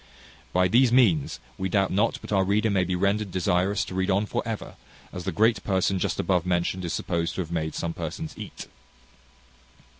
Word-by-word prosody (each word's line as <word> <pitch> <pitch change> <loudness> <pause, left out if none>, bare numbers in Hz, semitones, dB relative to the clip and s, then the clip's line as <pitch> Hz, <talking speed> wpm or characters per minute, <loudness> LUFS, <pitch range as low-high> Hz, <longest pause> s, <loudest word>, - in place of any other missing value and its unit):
By 90 0 +3
these 120 +5 +4
means, 105 - +3 0.2
we 95 0 -1
doubt 95 0 +1
not 105 +5 +1
but - - -9
our 95 -2 +3
reader 105 +3 +1
may 95 -2 +2
be 90 0 -1
rendered 100 +3 +1
desirous 95 +2 +1
to - - -8
read 95 +1 0
on 100 +2 +2
for - - -2
ever, 110 -2 -5 0.4
as 90 -1 -6
the - - -1
great 110 -1 +2
person 95 -1 +1
just - - -1
above 90 -3 +1
mentioned 90 +1 -1
is 85 - -3
supposed 85 -1 -2
to - - -1
have 85 -2 -6
made 80 -2 -2
some 85 0 -2
persons 80 -1 -5
eat. - - -8
95 Hz, 200 wpm, -26 LUFS, 90-100 Hz, 0.4 s, these